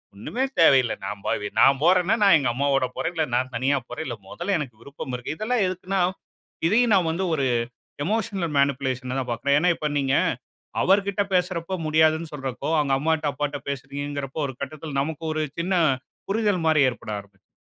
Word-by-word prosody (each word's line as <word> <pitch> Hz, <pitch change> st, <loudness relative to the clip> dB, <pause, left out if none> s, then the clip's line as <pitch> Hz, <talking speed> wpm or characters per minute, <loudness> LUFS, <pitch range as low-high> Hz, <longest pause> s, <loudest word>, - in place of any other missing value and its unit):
ஒண்ணுமே 240 Hz, -, -3 dB, 0.2 s
தேவையில்ல. 130 Hz, -7 st, +5 dB
நான் 100 Hz, 0 st, -5 dB
பாவி 105 Hz, -, -1 dB
நான் 135 Hz, 0 st, +6 dB
போறேன்னா, 180 Hz, +4 st, +4 dB
நான் 195 Hz, -4 st, +7 dB
எங்க 130 Hz, -, 0 dB
அம்மாவோட 135 Hz, 0 st, +1 dB
போறேன். 165 Hz, +2 st, -2 dB
இல்ல 160 Hz, -1 st, +1 dB
நான் 130 Hz, +1 st, 0 dB
தனியா 135 Hz, +4 st, +2 dB
போறேன். 160 Hz, -, -5 dB
இல்ல 120 Hz, -, -3 dB
மொதல்ல 185 Hz, +3 st, -2 dB
எனக்கு 120 Hz, -7 st, -6 dB
விருப்பம் 135 Hz, -1 st, -8 dB
இருக்கு. 130 Hz, +5 st, -5 dB
இதெல்லாம் 220 Hz, 0 st, +1 dB
எதுக்குன்னா, 185 Hz, +1 st, -2 dB, 0.7 s
இதையும் 225 Hz, +3 st, +3 dB
நான் 175 Hz, -3 st, +2 dB
வந்து 185 Hz, +4 st, -2 dB
ஒரு 140 Hz, -2 st, 0 dB, 0.6 s
எமோஷனல் 200 Hz, -7 st, -1 dB
மேனிப்புலேஷனா 130 Hz, -2 st, 0 dB
தான் 125 Hz, -2 st, -4 dB
பாக்குறேன். 140 Hz, +5 st, +2 dB
ஏன்னா 175 Hz, +2 st, +3 dB
இப்ப 150 Hz, -, -2 dB
நீங்க 135 Hz, 0 st, +1 dB, 0.7 s
அவர் 195 Hz, +1 st, +4 dB
கிட்ட 200 Hz, +1 st, 0 dB
பேசுறப்ப 180 Hz, 0 st, 0 dB
முடியாதுன்னு 155 Hz, +1 st, +2 dB
சொல்றப்போ, 135 Hz, 0 st, -4 dB
அவுங்க 140 Hz, -2 st, +1 dB
அம்மாட்ட, 155 Hz, -1 st, +1 dB
அப்பாட்ட 145 Hz, -1 st, -3 dB
பேசுறீங்கங்கறப்போ, 140 Hz, +1 st, -4 dB
ஒரு 130 Hz, -, -7 dB
கட்டத்தில 145 Hz, +1 st, -5 dB
நமக்கு 160 Hz, +2 st, -4 dB
ஒரு 155 Hz, 0 st, -1 dB, 0.2 s
சின்ன 185 Hz, +3 st, -1 dB, 0.6 s
புரிதல் 205 Hz, -5 st, +1 dB
மாரி 155 Hz, -2 st, +4 dB
ஏற்பட 120 Hz, -3 st, -8 dB
ஆரம்பிச்சு 100 Hz, -1 st, -18 dB
150 Hz, 170 wpm, -24 LUFS, 135-180 Hz, 0.7 s, நான்